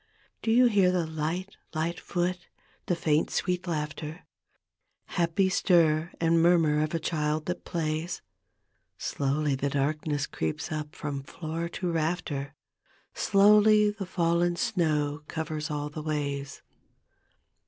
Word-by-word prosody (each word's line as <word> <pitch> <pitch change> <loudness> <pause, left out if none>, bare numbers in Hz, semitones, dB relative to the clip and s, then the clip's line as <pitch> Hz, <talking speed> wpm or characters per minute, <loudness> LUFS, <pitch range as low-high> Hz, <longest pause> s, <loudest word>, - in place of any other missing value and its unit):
Do - - -2
you 245 +3 +6
hear 200 -6 +4
the 180 -2 +1
light, 160 +5 -3 0.2
li^t 165 +2 -1
foot, 180 0 -2 0.4
the 175 - +2
faint 155 -2 +1
sweet 180 0 -1
laughter 155 +1 -4 0.8
Happy 175 +2 +1
stir 170 -4 +3
and 165 0 +3
murmur 165 -3 +4
of 155 +2 -1
a - - 0
child 155 -1 -1
that 180 - -4
plays: 165 0 -2 0.7
Slowly 145 +1 0
the 135 +1 -1
darkness 145 +1 0
creeps 80 - -3
ut> 155 0 -4
from 145 -2 -4
floor 165 +4 -5
to 175 0 -3
rafter, 155 -4 -2 0.6
Slowly 210 +1 +5
the 205 -3 -6
fallen 175 0 +1
snow 155 -9 0
covers 155 -1 -3
all 150 0 -3
the 155 - -6
ways. 140 -2 -3
160 Hz, 125 wpm, -28 LUFS, 150-175 Hz, 0.8 s, you